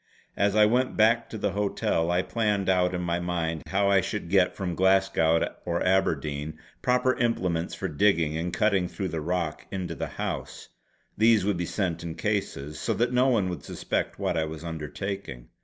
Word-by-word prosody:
As 100 Hz, 0 st, +1 dB
I 105 Hz, 0 st, +7 dB
went 125 Hz, +4 st, +1 dB
back 115 Hz, +1 st, +3 dB
to 110 Hz, -, -6 dB
the 100 Hz, -, -1 dB
hotel, 95 Hz, -4 st, 0 dB
I 90 Hz, +1 st, +2 dB
planned 105 Hz, -4 st, 0 dB
out 90 Hz, -1 st, +2 dB
in 90 Hz, -, -2 dB
my 85 Hz, 0 st, 0 dB
mind 85 Hz, -2 st, -2 dB
how 100 Hz, 0 st, +2 dB
I 95 Hz, -1 st, +5 dB
should 95 Hz, -4 st, -4 dB
get 95 Hz, -2 st, +3 dB
from 90 Hz, -3 st, -3 dB
Glasgow 95 Hz, -3 st, +3 dB, 0.2 s
or 85 Hz, 0 st, -1 dB
Aberdeen 80 Hz, -5 st, 0 dB, 0.2 s
proper 125 Hz, +1 st, +2 dB
implements 90 Hz, -8 st, 0 dB
for -, -, -3 dB
digging 80 Hz, -1 st, +2 dB
and 85 Hz, +2 st, -2 dB
cutting 100 Hz, -3 st, +2 dB
through 95 Hz, +1 st, -4 dB
the 80 Hz, -1 st, -3 dB
rock 85 Hz, -1 st, -2 dB
into 95 Hz, -2 st, -4 dB
the -, -, -4 dB
house; -, -, -5 dB, 0.5 s
these 110 Hz, -3 st, +5 dB
would 100 Hz, -3 st, +1 dB
be 85 Hz, -1 st, -2 dB
sent 85 Hz, -5 st, -2 dB
in 85 Hz, -1 st, -5 dB
cases, 85 Hz, -7 st, -2 dB
so -, -, -1 dB
that 120 Hz, +2 st, 0 dB
no 125 Hz, +1 st, +4 dB
one 110 Hz, -8 st, +2 dB
would 90 Hz, -, -5 dB
suspect -, -, -3 dB
what -, -, -1 dB
I 80 Hz, -1 st, +1 dB
was 80 Hz, +1 st, -7 dB
undertaking. 80 Hz, -3 st, -5 dB
90 Hz, 190 wpm, -27 LUFS, 85-105 Hz, 0.5 s, I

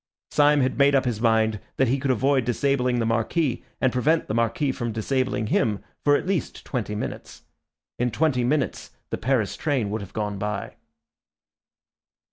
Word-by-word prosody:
Syme 145 Hz, -1 st, +4 dB
had 130 Hz, +1 st, 0 dB
made 140 Hz, 0 st, +5 dB
up 130 Hz, -, +3 dB
his 115 Hz, -3 st, -2 dB
mind 110 Hz, -2 st, +2 dB, 0.2 s
that 130 Hz, -, +3 dB
he 135 Hz, +4 st, +1 dB
could 140 Hz, 0 st, -2 dB
avoid 130 Hz, +2 st, +2 dB
disabling 125 Hz, 0 st, +1 dB
the 115 Hz, -, 0 dB
Marquis 120 Hz, +5 st, 0 dB, 0.2 s
and 130 Hz, -, +2 dB
prevent 155 Hz, +6 st, +2 dB
the -, -, -2 dB
Marquis 115 Hz, +5 st, +1 dB
from 120 Hz, -3 st, -3 dB
disabling 125 Hz, +1 st, -1 dB
him 105 Hz, -2 st, 0 dB, 0.2 s
for 145 Hz, 0 st, +5 dB
at -, -, -1 dB
least 185 Hz, -3 st, -2 dB
twenty 110 Hz, -5 st, -3 dB
minutes. 105 Hz, -, -6 dB, 0.6 s
In 125 Hz, 0 st, +2 dB
twenty 130 Hz, 0 st, +1 dB
minutes 145 Hz, +5 st, -1 dB, 0.2 s
the -, -, -2 dB
Paris 120 Hz, -5 st, 0 dB
train 130 Hz, -9 st, -1 dB
would 110 Hz, 0 st, -2 dB
have 100 Hz, -, -10 dB
gone 105 Hz, -2 st, -3 dB
by. 105 Hz, 0 st, -3 dB
125 Hz, 170 wpm, -24 LUFS, 110-140 Hz, 0.6 s, made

